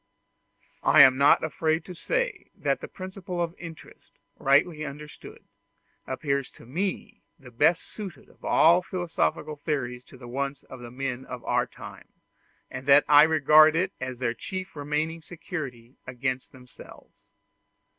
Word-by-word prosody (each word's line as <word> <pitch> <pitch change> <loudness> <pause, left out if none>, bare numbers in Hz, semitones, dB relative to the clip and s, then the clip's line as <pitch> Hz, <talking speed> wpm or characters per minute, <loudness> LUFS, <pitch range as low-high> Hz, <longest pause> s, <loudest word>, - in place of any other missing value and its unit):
I - - +6
am 130 0 +6
not 140 +2 +5
afraid 160 +1 -1
to 180 - -8
say - - -2
that - - -1
the - - -6
principle 185 -2 -7
of 170 -1 -1
interest, 165 -2 -12 0.2
rightly 150 +3 +2
understood, 150 +1 -10 0.6
appears 140 0 -2
to - - -16
me 180 +10 -4 0.2
the 125 -2 -15
best 160 +8 +3
suited 190 -10 -9
of - - -24
all 170 +3 +5
philosophical 165 - -2
theories 130 -5 -3
to - - -15
the 120 -1 -11
wants 140 +3 -4
of 130 - -12
the 120 -1 -9
men 130 0 -4
of 125 -1 -8
our - - +1
time, - - -12 0.6
and 130 +1 -7
that 140 +1 +7
I 145 0 +8
regard 155 0 +6
it 185 +3 0
as 130 -1 -4
their 120 -2 -1
chief 185 - -7
remaining 150 +3 -2
security 140 -7 -8
against 130 +1 -3
themselves. 125 -1 -15
145 Hz, 145 wpm, -26 LUFS, 130-165 Hz, 0.6 s, I